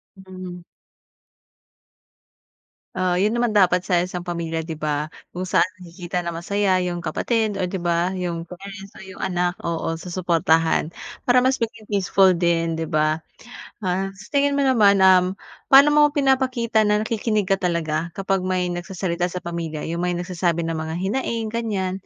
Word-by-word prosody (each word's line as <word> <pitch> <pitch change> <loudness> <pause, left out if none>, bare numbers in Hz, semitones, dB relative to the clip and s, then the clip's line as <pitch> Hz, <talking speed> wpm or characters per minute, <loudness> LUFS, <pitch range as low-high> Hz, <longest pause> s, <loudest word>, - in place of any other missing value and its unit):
Mhm. 185 -2 -9 2.3
Oo, 180 -1 0
yun 205 +4 +2
naman 235 -3 +1
dapat 180 -2 +4
sa 180 -1 +1
isang 180 -1 -5
pamilya, 170 -2 -3
di 160 -1 -6
ba? 150 0 -2 0.2
Kung 180 +1 -4
saan 185 -3 +4 0.2
makikita 175 0 -5
na 170 - -4
masaya 190 +3 0
yung 175 -1 -3
kapatid, 220 +3 -1
o 185 - 0
di 180 0 -4
ba? 175 +1 0
Yung 175 -3 -3
parents 195 +2 -10
o - - -12
yung 190 0 -11
anak, 180 -1 -1
oo, 165 -1 -2
susuportahan. 165 -2 +1 0.3
Para 250 0 +5
mas 260 +1 +2
maging 225 -2 -5
peaceful 190 -2 +3
din, 165 -1 +1
di 165 - -2
ba? 155 -1 +1 0.7
Ah, 190 +1 -1
sa 195 +1 -13
tingin 285 0 +2
mo 280 - +1
naman, 210 -7 +4
um, 185 0 +5 0.3
pa'no 275 +2 +7
mo 295 0 +6
pinapakita 255 -5 +2
na 210 0 +2
nakikinig 215 -3 -1
ka 195 - +3
talaga 170 -2 -1
kapag 195 0 0
may 185 -1 0
nagsasalita 175 0 -2
sa 180 0 -6
pamilya, 165 -3 -4
yung 170 - -3
may 180 0 0
nagsasabi 175 -1 -1
ng 165 -1 -2
mga 160 0 -4
hinaing, 225 +1 -2
ganyan? 200 -5 -2
185 Hz, 160 wpm, -22 LUFS, 170-205 Hz, 2.3 s, pa'no